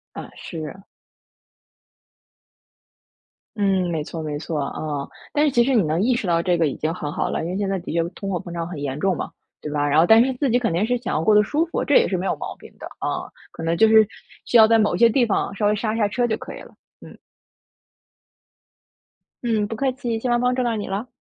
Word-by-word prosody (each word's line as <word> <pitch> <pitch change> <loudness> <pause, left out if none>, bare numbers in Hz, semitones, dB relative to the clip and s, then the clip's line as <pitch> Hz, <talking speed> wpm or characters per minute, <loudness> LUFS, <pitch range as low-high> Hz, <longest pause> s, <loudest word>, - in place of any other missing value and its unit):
啊， - - -8
是。 165 +3 -7 2.8
嗯， 190 -3 +1
没 160 -3 -2
错， 160 +1 -6
没 150 -1 -4
错， 155 -1 -4
啊， 145 0 -4 0.2
但 295 +1 +2
是 - - +3
其 240 -2 +4
实 265 +2 +1
你 225 - +4
能 155 +3 0
意 250 +5 +3
识 235 -5 -2
到 170 -1 +2
这 175 -1 +1
个 165 -2 +2
已 135 - -3
经 160 +2 -2
很 150 -4 -5
好 - - -2
了， - - -2
因 - - -3
为 185 - -3
现 200 -1 -1
在 195 -1 -1
的 170 - -7
确 170 -1 +2
通 195 +2 -7
货 180 - -1
膨 175 - -8
胀 170 -1 -3
很 175 - -7
严 140 0 -3
重 190 0 +1
嘛， - - -5 0.3
对 150 - -5
吧？ 145 -1 0
然 145 +2 +2
后 165 - +6
但 225 +4 +7
是 265 - -1
自 260 +1 -1
己 245 +2 +3
肯 230 -9 -1
定 185 +6 +1
是 245 +1 0
想 240 - -4
要 155 - 0
过 215 - +4
得 210 - +7
舒 300 +9 0
服， - - -2
这 290 - +2
也 - - +6
是 185 - -1
没 185 - -3
有 - - 0
毛 - - -6
病 - - -14
的， - - -9
啊， - - -3 0.2
可 - - -8
能 165 +1 0
就 220 - +6
是 220 -1 +6 0.4
需 240 - +3
要 220 -1 +8
在 230 - +5
某 210 -2 +2
一 - - -2
些 235 -1 +7
地 245 +2 +3
方 200 -2 -1
稍 205 0 +1
微 210 - +2
刹 215 +1 -2
刹 215 -2 +2
车 240 +3 0
就 220 - 0
可 - - -9
以 - - -9
了， - - -14 0.3
嗯。 - - -13 2.3
嗯， 220 -3 0
不 225 - -5
客 265 +3 0
气， 240 -4 -3
希 250 - -3
望 240 - +2
帮 250 0 +2
助 255 - 0
到 235 -2 0
你 210 - -4
了， 200 +6 -3
205 Hz, 275 characters per minute, -22 LUFS, 165-235 Hz, 2.8 s, 要